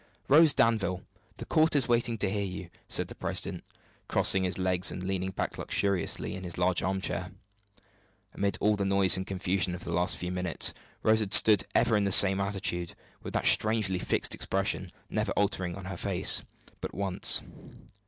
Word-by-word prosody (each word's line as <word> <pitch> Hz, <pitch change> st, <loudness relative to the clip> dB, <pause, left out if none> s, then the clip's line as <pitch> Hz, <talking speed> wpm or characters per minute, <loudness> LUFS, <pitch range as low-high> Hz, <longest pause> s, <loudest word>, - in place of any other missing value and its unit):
"Rose 155 Hz, +2 st, +6 dB
Danville, 105 Hz, -8 st, 0 dB, 0.3 s
the -, -, -8 dB
court 160 Hz, 0 st, +2 dB
is 135 Hz, -5 st, +2 dB
waiting 120 Hz, -1 st, 0 dB
to 100 Hz, -1 st, 0 dB
hear 100 Hz, 0 st, -2 dB
you," 90 Hz, -2 st, -7 dB, 0.2 s
said -, -, 0 dB
the -, -, -9 dB
president, -, -, -2 dB, 0.4 s
crossing 95 Hz, 0 st, +3 dB
his 90 Hz, -1 st, -2 dB
legs 95 Hz, +1 st, +1 dB
and 90 Hz, -, -6 dB
leaning 95 Hz, 0 st, -3 dB
back -, -, -5 dB
luxuriously 100 Hz, -4 st, -1 dB
in 95 Hz, -, -7 dB
his 85 Hz, -2 st, -6 dB
large 90 Hz, 0 st, +1 dB
armchair. 95 Hz, -1 st, -2 dB, 1.0 s
Amid 100 Hz, 0 st, -2 dB
all 105 Hz, 0 st, +2 dB
the 100 Hz, -, -3 dB
noise 95 Hz, -1 st, +3 dB
and 95 Hz, 0 st, -3 dB
confusion 95 Hz, -1 st, -2 dB
of 90 Hz, -, -10 dB
the 85 Hz, -, -5 dB
last 90 Hz, +1 st, -1 dB
few 90 Hz, 0 st, -5 dB
minutes, 90 Hz, -2 st, 0 dB, 0.3 s
Rose 110 Hz, 0 st, +3 dB
had 105 Hz, -3 st, +3 dB
stood 105 Hz, -3 st, +6 dB
ever 115 Hz, -, +2 dB
in 105 Hz, -1 st, +1 dB
the 100 Hz, -, -1 dB
same 95 Hz, 0 st, +6 dB
attitude, 95 Hz, -3 st, -3 dB, 0.3 s
with -, -, -8 dB
that -, -, -1 dB
strangely 105 Hz, -4 st, +2 dB
fixed -, -, -1 dB
expression -, -, -2 dB, 0.2 s
never -, -, -2 dB
altering 95 Hz, -3 st, -2 dB
on 95 Hz, -1 st, -9 dB
her 95 Hz, -1 st, -6 dB
face -, -, +1 dB, 0.4 s
but -, -, -7 dB
once. 95 Hz, -1 st, +2 dB
95 Hz, 180 wpm, -28 LUFS, 90-105 Hz, 1.0 s, Rose